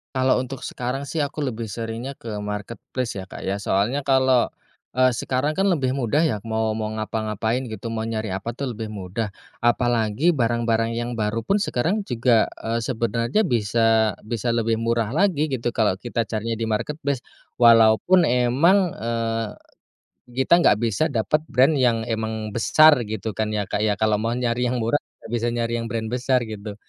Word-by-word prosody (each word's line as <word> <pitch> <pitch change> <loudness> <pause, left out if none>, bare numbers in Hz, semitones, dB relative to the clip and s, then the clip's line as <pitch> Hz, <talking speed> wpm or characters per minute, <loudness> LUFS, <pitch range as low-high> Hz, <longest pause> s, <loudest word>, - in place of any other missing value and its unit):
Kalau 130 0 +3
untuk 130 0 -4
sekarang 135 +3 -4
sih - - -5
aku 145 +2 -6
lebih 120 -5 -3
seringnya 115 +4 -5
ke 110 -5 -7
marketplace 105 +3 -5
ya, 95 - -5
Kak, 95 - -10
ya. 100 +1 -2
Soalnya 105 +8 0
kalau, 130 -2 +4 0.5
eee, 130 +1 +4
sekarang 130 +6 -1
kan 195 - +2
lebih 155 -10 +2
mudah 135 +5 +1
ya 150 -10 +1
mau 110 -1 -1
mau 110 - -2
ngapan-gapain 110 +3 -2
gitu, 115 0 -6
mau 110 -1 -3
nyari 110 -1 -3
apa 95 +5 -4
tuh 125 -2 -5
lebih 110 -1 -5
mudah, 100 +2 -4 0.2
apalagi 120 +3 +2
barang-barang 115 -5 +1
yang 120 +1 -3
baru 110 +1 -1
pun 195 - +1
sekarang 195 - -1
juga, 120 - +3 0.2
eee, 115 +1 -1
sebenarnya 115 - 0
bisa 115 - +2
bisa 115 +1 -2
lebih 115 -1 +1
murah 115 -1 0
lagi 160 -6 +2
gitu 120 -2 -2
kalau 105 -5 +1
kita 115 0 -3
carinya 115 +1 -2
di 110 - -1
marketplace. 140 +4 -2 0.3
Walaupun 115 +9 +6
emang, 150 +8 +3
eee, 115 -1 -2 0.8
kita 135 +8 +3
nggak 105 - +5
bisa 115 +5 0
dapat 135 +5 0
brand 135 +5 +4
yang 120 -4 +2
emang 110 -2 -3
besar 155 +6 +6
gitu 110 -1 -4
kan 110 -1 -1
ya, 105 -2 -1
Kak, 105 - -2
ya, 105 -2 +1
kalau 110 -1 +2
mau 110 +2 0
nyari 125 0 0
yang 125 +1 0
murah, 115 +6 +2 0.2
nggak - - -10
bisa 120 0 0
nyari 115 0 -1
yang 115 - -4
brand 115 -1 -3
besar 125 +1 +1
gitu. 105 -2 -7
115 Hz, 175 wpm, -23 LUFS, 110-130 Hz, 0.8 s, Walaupun